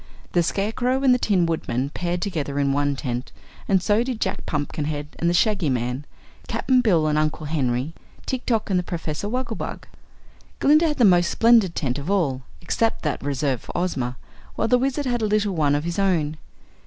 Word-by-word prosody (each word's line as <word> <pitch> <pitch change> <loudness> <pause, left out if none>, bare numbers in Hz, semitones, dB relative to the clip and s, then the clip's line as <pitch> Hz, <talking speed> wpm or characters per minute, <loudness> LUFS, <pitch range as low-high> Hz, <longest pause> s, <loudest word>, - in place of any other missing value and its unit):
The 175 - +3
Scarecrow 235 +9 0
and 260 -2 +6
the 250 - +2
Tin 190 -7 +2
Woodman 140 -5 -2
paired 175 +1 -2
together 150 -8 -3
in 140 -1 +2
one 145 0 +1
tent 125 -2 -4 0.4
and 190 -2 +3
so 210 +4 +3
did 250 -3 -4
Jack 190 -2 -2
Pumpkinhead 150 0 -3
and 170 - +2
the - - +1
Shaggy 195 -5 +2
Man, 125 +2 -2 0.4
Cap'n 255 -1 +2
Bill 175 -10 +3
and 150 0 +2
Uncle 155 0 -1
Henry, 135 -1 -1 0.3
Tik 260 -1 -4
Tok 220 -4 0
and 180 -1 +2
Professor 165 +2 -4
Wogglebug. 250 -1 -4 0.8
Glinda 305 +3 +5
had 300 - -1
the 245 - +5
most 175 -3 +5
splendid 225 -6 +4
tent 130 -3 -1
of 145 +5 -6
all, 155 -10 +1 0.2
except 225 +6 0
that 150 - -2
reserved 140 -2 -1
for - - -7
Ozma, 130 -9 -2 0.4
while 225 - 0
the 250 +1 +4
Wizard 275 +2 -1
had 240 -2 0
a - - +1
little 210 -1 +1
one 150 -4 +2
of 145 - -1
his 170 +3 -3
own. 160 -6 +1
175 Hz, 190 wpm, -23 LUFS, 145-215 Hz, 0.8 s, and